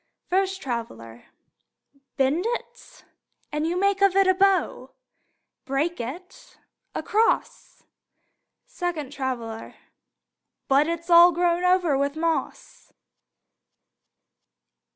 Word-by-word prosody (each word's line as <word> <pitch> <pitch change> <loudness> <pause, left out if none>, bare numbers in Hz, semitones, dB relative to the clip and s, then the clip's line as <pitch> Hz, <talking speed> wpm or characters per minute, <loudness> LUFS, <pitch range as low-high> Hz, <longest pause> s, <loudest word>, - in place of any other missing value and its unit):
First 385 +1 -1
Traveler: 120 - -6 0.9
Bend 275 +6 +1
it, 485 +1 -7 0.5
and 300 +1 -1
you 350 +2 -1
make 395 0 +1
of 395 -1 +4
it 390 0 +5
a 375 - +4
bow. 390 0 0 0.7
Break 295 +6 -2
it, 360 - -10 0.4
a - - -3
cross. 440 +2 -1 0.8
Second 315 -6 -5
Traveler: 240 -5 -5 0.9
But 280 +2 +3
it's 335 +1 -4
all 345 +1 +8
grown 345 +1 0
over 360 -5 +3
with 280 +1 -1
moss! 325 0 -4
340 Hz, 95 wpm, -24 LUFS, 275-375 Hz, 0.9 s, all